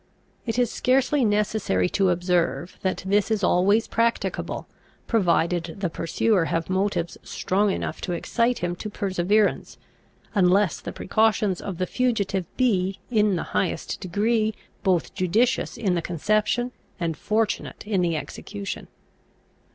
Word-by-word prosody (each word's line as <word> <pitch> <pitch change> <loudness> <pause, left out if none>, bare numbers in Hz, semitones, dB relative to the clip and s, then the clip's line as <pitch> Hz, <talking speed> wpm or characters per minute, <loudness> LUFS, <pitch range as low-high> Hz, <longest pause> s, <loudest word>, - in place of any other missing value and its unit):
It 225 0 -1
is 245 -2 +2
scarcely 265 +2 +2
necessary 205 - +1
to 195 -2 +2
observe 175 -3 0
that 190 -1 -1
this 200 +2 +2
is 215 -3 0
always 200 +5 +3
practicable, 230 0 -1 0.4
provided 175 -5 +1
the 185 -4 -2
pursuer 180 +3 +1
have 165 +3 -2
motives 190 -3 -1
strong 200 +3 0
enough - - -3
to 180 - -2
excite 235 +7 0
him 175 0 -2
to 210 - -5
perseverance, 200 +1 0 0.6
unless 190 -2 +3
the - - -5
precautions 215 -2 +1
of 190 -4 -5
the 185 - 0
fugitive 200 -5 0
be, 195 -7 +2
in 210 -4 +3
the 170 - -2
highest 185 - -1
degree, 215 +4 0 0.3
both 175 -10 +1
judicious 225 +8 +1
in 205 -6 +1
the 170 - 0
conception, 215 +8 0 0.3
and 165 -2 -1
fortunate 215 +5 -1
in 205 -3 +1
the 170 -2 +1
execution. 200 +5 -6
195 Hz, 135 wpm, -25 LUFS, 180-220 Hz, 0.6 s, always